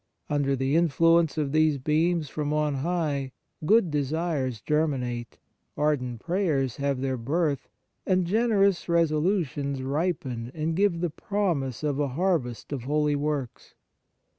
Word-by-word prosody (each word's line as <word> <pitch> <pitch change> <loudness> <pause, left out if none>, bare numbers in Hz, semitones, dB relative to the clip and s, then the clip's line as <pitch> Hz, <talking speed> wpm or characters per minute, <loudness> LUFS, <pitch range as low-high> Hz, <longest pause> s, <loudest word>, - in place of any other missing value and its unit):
Under 140 -2 +1
the 135 +2 0
influence 165 0 +3
of 145 -3 0
these 155 -1 +3
beams 155 +4 +1
from 150 +1 -3
on 150 -1 +1
high, 140 -3 -1 0.3
good 210 -5 +4
desires 145 -4 -1
germinate, 125 -5 -1 0.4
ardent 125 -6 0
prayers 165 - 0
have 140 -2 -1
their 130 -1 -1
birth, 145 +4 -1 0.3
and 185 -2 +2
generous 200 -2 +2
resolutions 155 -4 +1
ripen 135 -5 -2
and 160 +1 -1
give 190 -3 +2
the 175 -3 -1
promise 160 - -2
of 145 -2 0
a 145 - +1
harvest 160 -10 -1
of 130 -4 -4
holy 150 +1 +1
works. 145 -4 -3
150 Hz, 130 wpm, -26 LUFS, 135-170 Hz, 0.4 s, good